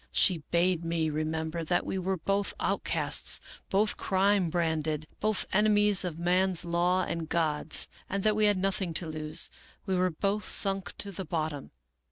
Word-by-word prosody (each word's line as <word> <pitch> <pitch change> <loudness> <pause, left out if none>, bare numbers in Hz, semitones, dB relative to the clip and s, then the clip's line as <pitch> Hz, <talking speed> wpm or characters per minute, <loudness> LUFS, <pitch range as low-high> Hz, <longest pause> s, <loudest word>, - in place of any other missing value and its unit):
She 180 -4 +3
bade 175 0 +1
me 165 -1 -1
remember 160 +2 -3
that 175 +2 0
we 190 - -3
were 190 +1 -1
both 195 +4 -1
out - - -1
casts, - - 0 0.3
both 210 +2 +1
crime 195 -1 +1
branded, 160 -2 -1
both 215 -1 0
enemies 210 -1 +4
of 175 -3 -4
man's 180 +1 +2
law 175 +2 +1
and 165 -2 -4
God's; 155 -2 0 0.2
that 200 +2 +1
we 215 0 +3
had 205 -2 +3
nothing 185 -3 -2
to 175 - 0
lose; 155 +1 +1 0.3
we 190 - -2
were 185 0 +2
both 200 +5 -1
sunk 195 -2 +2
to 200 - +2
the 190 0 -6
bottom. 155 -4 -4
180 Hz, 165 wpm, -29 LUFS, 160-195 Hz, 0.3 s, enemies